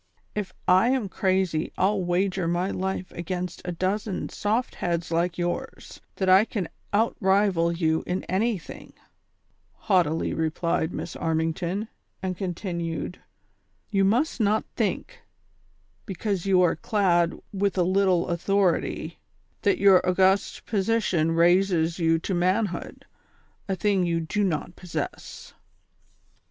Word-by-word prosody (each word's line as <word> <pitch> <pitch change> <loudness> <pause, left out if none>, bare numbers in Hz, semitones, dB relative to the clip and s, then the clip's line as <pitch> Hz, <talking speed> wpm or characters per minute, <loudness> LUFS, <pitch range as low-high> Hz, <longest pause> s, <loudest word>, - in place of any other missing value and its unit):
If 205 -3 -3 0.2
I 185 +6 +5
am 255 -6 0
crazy 185 -4 0
I'll 195 0 +2
wager 180 0 0
my 175 +3 0
life 190 -1 -3
against 180 0 -4
a 180 - -2
dozen 190 +3 -2
soft 220 +4 -1
heads 170 -1 -2
like 170 +1 0
yours, 175 0 -4
that 190 - -1
I 190 +2 +7
can 205 -7 -4 0.2
out 225 +3 +2
rival 190 -4 +3
you 160 -2 0
in 180 +1 -2
anything," 195 0 -3 0.8
haughtily 175 -7 +1
replied 160 +1 -1
Miss 170 - -5
Armington; 165 +5 -1 0.3
and 185 -1 -3
continued: 175 -3 -4 0.7
"You 195 -2 +2
must 245 +10 +1
not 215 0 +2
think, - - -2 0.9
because 195 -1 -2
you 185 -2 +5
are 175 - +3
clad 175 -2 +1
with 200 0 0
a 180 - +4
little 185 -1 +2
authority, 185 +1 0 0.4
that 200 -2 +2
your 195 -2 +6
august 190 +2 +2
position 195 -6 +1
raises 175 0 +3
you 165 -1 +3
to 185 +4 -3
manhood, 185 +1 -1 0.6
a 190 - +1
thing 195 -1 +1
you 170 -1 +1
do 185 +6 -1
not 175 -1 -2
possess." 180 -3 -6
185 Hz, 125 wpm, -25 LUFS, 170-200 Hz, 0.9 s, I